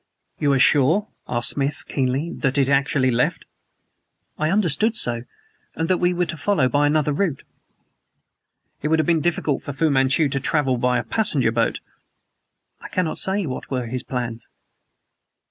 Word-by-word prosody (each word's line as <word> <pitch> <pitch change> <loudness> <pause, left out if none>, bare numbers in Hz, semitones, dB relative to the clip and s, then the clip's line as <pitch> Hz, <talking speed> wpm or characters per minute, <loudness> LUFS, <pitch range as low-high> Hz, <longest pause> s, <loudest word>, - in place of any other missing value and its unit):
"You 145 - +2
are - - +3
sure," 150 +11 +3 0.2
asked 120 -1 +2
Smith 140 +1 -2
keenly, 135 +4 -1
"that 135 -1 -1
it - - +5
has - - -2
actually 135 -1 +2
left?" 120 +1 0 0.9
"I 155 +1 +1
understood 210 +3 +2
so, 120 - -2 0.5
and 165 +1 -2
that 185 - +2
we 175 0 +2
were 180 0 0
to 165 - -5
follow 145 -2 +1
by 145 +3 +2
another 150 0 +1
route." 160 -4 -1 1.4
"It 150 - -1
would 160 +1 +2
have 155 - +1
been 165 -1 +2
difficult 160 -4 -1
for 145 - -6
Fu 155 +3 +1
Manchu 135 +3 +3
to 135 0 -1
travel 145 -3 +1
by 125 0 +2
a 120 - -2
passenger 135 - +1
boat?" 115 0 0 1.0
"I - - -9
cannot 180 -4 -1
say 195 0 0
what 130 -4 -6
were 125 -2 -2
his 125 +2 -3
plans." 120 -3 -5
145 Hz, 170 wpm, -22 LUFS, 130-165 Hz, 1.4 s, it